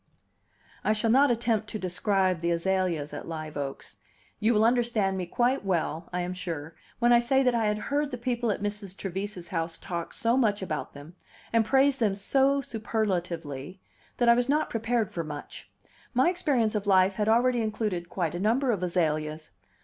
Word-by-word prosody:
I 215 Hz, -, +3 dB
shall 220 Hz, +1 st, +1 dB
not 275 Hz, +3 st, +5 dB
attempt 230 Hz, -3 st, 0 dB
to -, -, -4 dB
describe 185 Hz, -1 st, 0 dB
the 170 Hz, -, 0 dB
azaleas 170 Hz, -3 st, 0 dB
at 145 Hz, -, -7 dB
Live 155 Hz, -2 st, -6 dB
Oaks. 135 Hz, -7 st, -5 dB, 0.4 s
You 220 Hz, +2 st, +3 dB
will 215 Hz, +1 st, +4 dB
understand 230 Hz, -5 st, +2 dB
me 185 Hz, -2 st, -3 dB
quite 245 Hz, +7 st, +1 dB
well, 170 Hz, -4 st, -1 dB
I 180 Hz, 0 st, -1 dB
am 175 Hz, +1 st, -3 dB
sure, 165 Hz, -4 st, -5 dB, 0.2 s
when 240 Hz, 0 st, +4 dB
I 240 Hz, -, +7 dB
say 265 Hz, +3 st, +2 dB
that 250 Hz, -1 st, +3 dB
I 230 Hz, -2 st, +1 dB
had 210 Hz, 0 st, +1 dB
heard 285 Hz, +6 st, -1 dB
the 250 Hz, -, -5 dB
people 240 Hz, -1 st, -1 dB
at 205 Hz, 0 st, -2 dB
Mrs. 205 Hz, -2 st, -4 dB
Trevise's 190 Hz, -1 st, -5 dB
house 165 Hz, -1 st, -2 dB
talk 170 Hz, -2 st, -5 dB
so 230 Hz, +1 st, +1 dB
much 210 Hz, -6 st, +2 dB
about 155 Hz, -5 st, -4 dB
them, 145 Hz, +4 st, -11 dB, 0.4 s
and 230 Hz, -1 st, +4 dB
praise 270 Hz, +4 st, +3 dB
them 215 Hz, -6 st, +1 dB
so 270 Hz, +7 st, +2 dB
superlatively, 180 Hz, -, -3 dB, 0.4 s
that 240 Hz, -, +2 dB
I 235 Hz, -, +8 dB
was 245 Hz, +2 st, +1 dB
not 300 Hz, +2 st, +1 dB
prepared 230 Hz, -1 st, 0 dB
for 170 Hz, -, -3 dB
much: 150 Hz, -2 st, -8 dB, 0.5 s
my 260 Hz, +8 st, +4 dB
experience 265 Hz, -11 st, +1 dB
of 210 Hz, -1 st, -2 dB
life 190 Hz, 0 st, +5 dB
had 210 Hz, +2 st, 0 dB
already 240 Hz, +1 st, +3 dB
included 210 Hz, -5 st, -2 dB
quite 170 Hz, -4 st, -2 dB
a 175 Hz, -, -4 dB
number 240 Hz, +6 st, +2 dB
of 205 Hz, -6 st, -1 dB
azaleas. 155 Hz, -3 st, -1 dB
205 Hz, 190 wpm, -27 LUFS, 175-235 Hz, 0.5 s, I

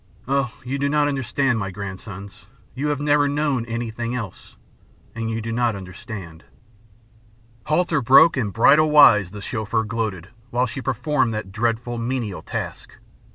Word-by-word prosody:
Oh, 135 Hz, -2 st, 0 dB
you 135 Hz, +3 st, -3 dB
do 140 Hz, +1 st, +1 dB
not 150 Hz, 0 st, +2 dB
understand, 135 Hz, -2 st, 0 dB
my 95 Hz, -2 st, -3 dB
grandsons. 100 Hz, 0 st, -8 dB, 0.3 s
You 145 Hz, +3 st, -2 dB
have 145 Hz, -2 st, -1 dB
never 145 Hz, 0 st, +3 dB
known 140 Hz, -4 st, 0 dB
anything 115 Hz, +1 st, -3 dB
else, 110 Hz, -8 st, -7 dB, 0.6 s
and 115 Hz, 0 st, -3 dB
you 115 Hz, 0 st, -2 dB
do 115 Hz, +1 st, -4 dB
not 120 Hz, -1 st, +1 dB
understand. 90 Hz, -3 st, -9 dB, 1.2 s
"'Halter 160 Hz, -1 st, +1 dB
broke 135 Hz, +7 st, +6 dB
and 115 Hz, -7 st, -1 dB
bridle 150 Hz, +8 st, +5 dB
wise,' 115 Hz, -11 st, +7 dB
the 100 Hz, +1 st, -9 dB
Chauffeur 110 Hz, 0 st, -1 dB
gloated, 105 Hz, -5 st, -3 dB, 0.2 s
while 125 Hz, +1 st, +1 dB
she 130 Hz, +2 st, -6 dB
performed 130 Hz, -1 st, 0 dB
that 110 Hz, -3 st, -5 dB
dreadful, 115 Hz, +3 st, -1 dB
menial 115 Hz, -5 st, -3 dB
task. -, -, -6 dB
115 Hz, 150 wpm, -22 LUFS, 105-140 Hz, 1.2 s, wise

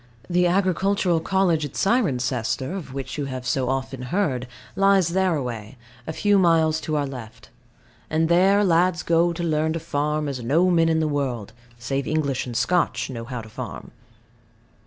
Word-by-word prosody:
The 180 Hz, 0 st, +2 dB
Agricultural 185 Hz, -1 st, +1 dB
College 175 Hz, -2 st, +1 dB
at 145 Hz, -, -5 dB
Cirencester, 130 Hz, -, 0 dB
of 170 Hz, -9 st, -7 dB
which 135 Hz, +2 st, -5 dB
you 145 Hz, -, -1 dB
have 130 Hz, -2 st, -6 dB
so 125 Hz, 0 st, 0 dB
often 135 Hz, -1 st, -3 dB
heard, 130 Hz, -4 st, -1 dB, 0.3 s
lies 195 Hz, -3 st, +4 dB
thereaway, 135 Hz, -, -1 dB, 0.3 s
a -, -, -2 dB
few 205 Hz, +4 st, +2 dB
miles 160 Hz, -3 st, +3 dB
to 155 Hz, -, -2 dB
our 145 Hz, -1 st, +1 dB
left; 125 Hz, -5 st, -10 dB, 0.6 s
and 160 Hz, +1 st, +1 dB
there 190 Hz, +4 st, +4 dB
lads 175 Hz, -1 st, +2 dB
go 170 Hz, +1 st, +3 dB
to 170 Hz, 0 st, -4 dB
learn 160 Hz, -1 st, +1 dB
to 165 Hz, -, -2 dB
farm 150 Hz, 0 st, -1 dB
as 135 Hz, -3 st, -4 dB
no 160 Hz, +10 st, +2 dB
men 165 Hz, -1 st, +3 dB
in 160 Hz, 0 st, +2 dB
the 155 Hz, -, +1 dB
world, 130 Hz, -8 st, -2 dB, 0.2 s
save 135 Hz, +3 st, -3 dB
English 140 Hz, -5 st, -1 dB
and 120 Hz, -2 st, -3 dB
Scotch, 175 Hz, -5 st, 0 dB
know 115 Hz, -2 st, -6 dB
how 125 Hz, -1 st, -5 dB
to 110 Hz, -, -12 dB
farm. -, -, -8 dB
155 Hz, 170 wpm, -23 LUFS, 130-175 Hz, 0.6 s, lies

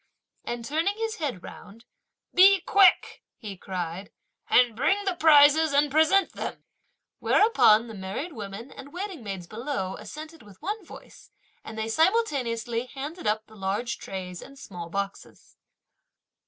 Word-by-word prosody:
and 240 Hz, -1 st, -5 dB
turning 325 Hz, -, -1 dB
his 445 Hz, -1 st, -3 dB
head 270 Hz, -, -4 dB
round, 230 Hz, +4 st, -12 dB, 0.5 s
"Be 390 Hz, +1 st, +6 dB
quick," 390 Hz, 0 st, +3 dB, 0.2 s
he 210 Hz, -4 st, -8 dB
cried, 180 Hz, 0 st, -6 dB, 0.4 s
"and 245 Hz, -3 st, +4 dB
bring 325 Hz, -, +2 dB
the 385 Hz, -, +1 dB
prizes 310 Hz, -1 st, +6 dB
and 285 Hz, 0 st, +3 dB
present 320 Hz, +6 st, +3 dB
them!" -, -, -6 dB, 0.6 s
whereupon 240 Hz, -, +4 dB
the 225 Hz, -, -10 dB
married 200 Hz, -, -6 dB
women 210 Hz, +2 st, -8 dB
and 275 Hz, +1 st, -11 dB
waiting 365 Hz, -, -6 dB
maids 195 Hz, -4 st, -6 dB
below 215 Hz, -3 st, -4 dB
assented 310 Hz, +1 st, -10 dB
with 205 Hz, -3 st, -17 dB
one 420 Hz, +1 st, -4 dB
voice, -, -, -14 dB, 0.3 s
and 220 Hz, -, -9 dB
they 220 Hz, 0 st, -2 dB
simultaneously 250 Hz, -, 0 dB
handed 290 Hz, +7 st, -7 dB
up 215 Hz, +1 st, 0 dB
the 220 Hz, -, -18 dB
large 205 Hz, +4 st, -3 dB
trays 180 Hz, -2 st, -7 dB
and 275 Hz, -, -13 dB
small 175 Hz, -9 st, -9 dB
boxes. 200 Hz, +2 st, -6 dB
250 Hz, 140 wpm, -26 LUFS, 205-320 Hz, 0.6 s, Be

